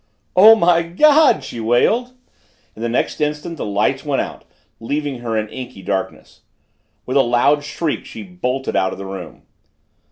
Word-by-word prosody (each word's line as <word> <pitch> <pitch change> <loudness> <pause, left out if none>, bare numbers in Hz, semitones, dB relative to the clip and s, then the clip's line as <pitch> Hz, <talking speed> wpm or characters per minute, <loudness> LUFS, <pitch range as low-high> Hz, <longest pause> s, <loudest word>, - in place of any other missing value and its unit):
"Oh, 215 +5 +9
my 170 -4 +3
God!" 275 - +4
she 120 - -7
wailed, 215 - +1 0.6
and 110 - -9
the 120 - -1
next 120 - -1
instant 150 +3 -3
the - - -4
lights 100 0 0
went - - -1
out, - - -5 0.3
leaving 140 +2 -3
her 115 -2 -3
in 110 0 -1
inky 125 -6 -9
darkness. 95 0 -5 0.6
With 130 +2 -1
a - - +6
loud 130 +4 +2
shriek 150 +1 -3
she 110 - -9
bolted 125 +9 -4
out 95 0 +1
of - - -9
the 100 - -7
room. 95 -4 -9
130 Hz, 165 wpm, -19 LUFS, 110-165 Hz, 0.6 s, Oh